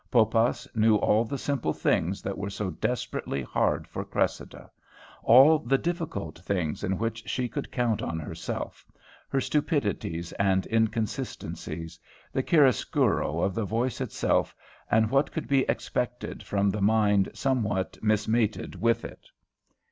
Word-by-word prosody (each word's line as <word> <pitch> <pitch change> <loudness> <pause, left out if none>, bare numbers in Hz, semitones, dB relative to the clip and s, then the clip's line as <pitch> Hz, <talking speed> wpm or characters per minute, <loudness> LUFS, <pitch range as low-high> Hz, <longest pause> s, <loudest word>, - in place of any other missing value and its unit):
Poppas 115 0 +2
knew 110 0 +4
all 105 +2 +3
the 140 +5 -4
simple 130 - -1
things 90 +4 0
that 100 - -3
were 100 +1 -4
so 100 -1 -3
desperately 110 - -3
hard - - 0
for - - -5
Cressida, - - -3 0.5
all 135 +7 +7
the 135 -1 +1
difficult 160 - -4
things 90 -4 -2
in 95 -1 0
which 115 0 -3
she 125 -1 -1
could 115 - -5
count 120 -4 0
on 85 - -3
herself; 80 - -5 0.5
her 135 - +1
stupidities 105 - -1
and 95 -1 +2
inconsistencies, 105 -7 -2 0.3
the 130 - +1
chiaroscuro 130 - +2
of 95 - +1
the 115 - -1
voice 115 +4 -1
itself - - 0 0.3
and 110 0 +3
what 135 +2 +2
could 160 - -4
be 135 -1 +2
expected 125 0 -2
from 100 0 0
the 105 +1 -3
mind 105 -1 +3
somewhat 110 -8 0
mismated 110 +1 +1
with 115 0 +2
it. - - -11
110 Hz, 140 wpm, -27 LUFS, 100-125 Hz, 0.5 s, all